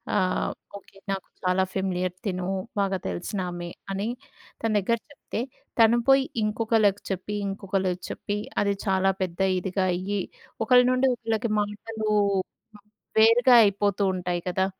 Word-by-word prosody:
ఆహ్, 185 -2 +1 0.3
ఓకే. 195 0 -18
నాకు 195 -1 -4 0.2
చాలా 185 +1 +2
ఫెమిలియర్ 185 -2 -1
తినూ, 185 -2 -2 0.3
బాగా 195 -1 +1
తెలిసినామె 175 - -4 0.2
అని, 200 +3 -2 0.6
తన 225 - +2
దెగ్గర 230 +4 +1
చెప్తే, 275 - -6 0.4
తను 230 +1 +6
పోయి 270 0 +6 0.2
ఇంకొకళ్ళకి 215 -2 +2
చెప్పి, 190 +3 -3
ఇంకొకళ్ళకి 190 -2 -2
చెప్పి, 205 0 -3 0.2
అది 200 0 +2
చాలా 195 0 +3
పెద్ద 180 -1 -3 0.2
ఇదిగా 185 +1 -1
అయ్యి, 195 +3 -2 0.5
ఒకళ్ళ 250 +1 +7
నుండి 255 +1 +3
ఒకళ్ళకి 225 -1 -2
మాటలు 215 +1 -4 1.1
వేరుగా 240 +3 +6
అయిపోతూ 200 0 +1
ఉంటాయి 180 -1 -2
కదా! 190 +1 +1
195 Hz, 125 wpm, -26 LUFS, 185-220 Hz, 1.1 s, ఒకళ్ళ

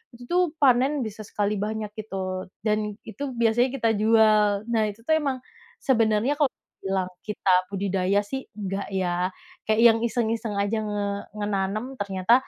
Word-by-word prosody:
itu 335 +7 0
panen 265 +1 +4
bisa 215 0 -7
sekali 205 0 -1
banyak 215 0 -3
itu. 190 -3 -4 0.2
Dan 210 -1 0
itu 225 +6 -6
biasanya 235 +1 +3
kita 230 -4 +1
jual. 215 -2 +4
Nah 225 -2 +3
itu 210 +2 -10
tuh 315 - -2
memang, 275 -4 -1 0.4
sebenarnya 230 0 +2
kalau 290 - +5 0.4
bilang 190 -1 -1 0.2
kita 210 -2 -2 0.2
budidaya 195 0 +1
sih 265 +6 -6
enggak 195 -1 -3
ya, 180 -1 0 0.4
kayak 220 +1 +3
yang 225 -1 +7
iseng-iseng 225 -2 -1
aja 205 +2 0
nge 205 -1 -2 0.4
menanam 205 +5 -2
ternyata 195 +2 +1
215 Hz, 145 wpm, -25 LUFS, 200-235 Hz, 0.4 s, yang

